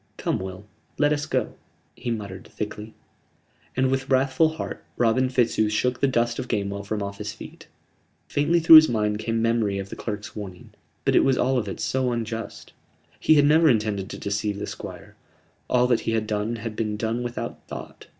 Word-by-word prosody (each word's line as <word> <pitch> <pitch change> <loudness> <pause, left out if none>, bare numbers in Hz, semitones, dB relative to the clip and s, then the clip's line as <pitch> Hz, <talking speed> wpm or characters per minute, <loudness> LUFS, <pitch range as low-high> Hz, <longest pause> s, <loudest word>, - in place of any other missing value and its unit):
"Come, - - -1
Will; 95 +1 -7 0.3
let 145 0 +3
us 145 +1 -2
go," 130 -6 -1 0.4
he - - -5
muttered, 100 -5 -5
thickly: 105 +1 -6 0.8
and 130 0 +2
with 135 0 -1
wrathful 135 +4 +3
heart 160 - -6
Robin 125 +2 +2
Fitzooth 120 -4 +2
shook 125 +3 0
the 140 - +3
dust 120 -2 0
of 130 - -4
Gamewell 100 -3 -2
from 105 0 -3
off 100 0 -6
his 105 0 -4
feet. 110 - -12 0.6
Faintly 150 +4 +2
through 160 0 +10
his 155 0 +7
mind 105 -2 0
came 115 0 -1
memory 115 -4 +1
of 100 0 -5
the - - -7
clerk's 105 -2 -6
warning: 95 -4 -8 0.3
but - - +3
it - - +6
was 135 -1 +3
all 130 +1 +2
of 105 - -4
it 95 - -5
so 130 -1 0
unjust! 115 -1 -5 0.5
He 155 - +5
had 145 -1 +5
never 160 +2 +5
intended 105 -5 0
to - - -6
deceive 105 0 -2
the 100 - -4
Squire: - - -9 0.5
all 125 0 +4
that 125 -2 +3
he 115 - -2
had 110 -1 0
done 105 +2 -2
had 115 -1 -6
been 105 -1 -2
done 115 +2 -1
without 120 0 -5
thought. - - -9
115 Hz, 195 wpm, -25 LUFS, 105-130 Hz, 0.8 s, through